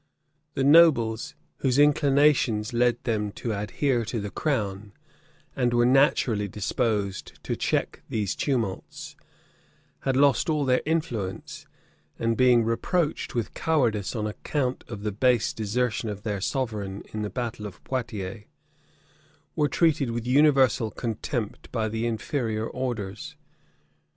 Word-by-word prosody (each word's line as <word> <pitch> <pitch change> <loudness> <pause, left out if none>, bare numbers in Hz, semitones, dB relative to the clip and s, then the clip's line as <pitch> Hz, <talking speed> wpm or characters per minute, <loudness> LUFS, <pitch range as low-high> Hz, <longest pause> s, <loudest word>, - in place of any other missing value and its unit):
The 135 - 0
nobles, 135 -7 +5 0.2
whose 130 -1 +1
inclinations 140 -6 +3
led 120 0 +2
them 105 -3 -1
to 115 - -3
adhere 120 +5 0
to 115 +1 -3
the 105 -1 -5
crown, 105 -8 -2 0.6
and 120 -2 +1
were 120 0 +4
naturally 125 -5 +3
disposed 105 0 -2
to - - -2
check - - -1
these 105 -4 -1
tumults, 115 -9 -3 0.8
had 135 -1 -1
lost 140 +1 +3
all 150 -2 +1
their 125 -1 +3
influence; 120 - -3 0.5
and 115 0 0
being 125 -2 +5
reproached 150 +9 -1
with 120 -3 -2
cowardice 120 -11 0
on 110 -2 -2
account 125 +4 -2
of 105 -3 -7
the 105 - -1
base 120 +2 +2
desertion 115 +1 -1
of 105 0 -6
their 105 -3 -2
sovereign 105 -6 -3
in 110 - -3
the 105 - -2
battle 110 -1 -4
of 95 - -13
Poiotiers, 110 -5 -4 1.1
were 150 -1 +2
treated 155 -6 +2
with 115 0 -3
universal 130 -4 +4
contempt 115 0 -4
by 110 -2 -1
the 115 +2 -2
inferior 115 -1 -2
orders. 115 -6 -4
115 Hz, 130 wpm, -26 LUFS, 105-135 Hz, 1.1 s, nobles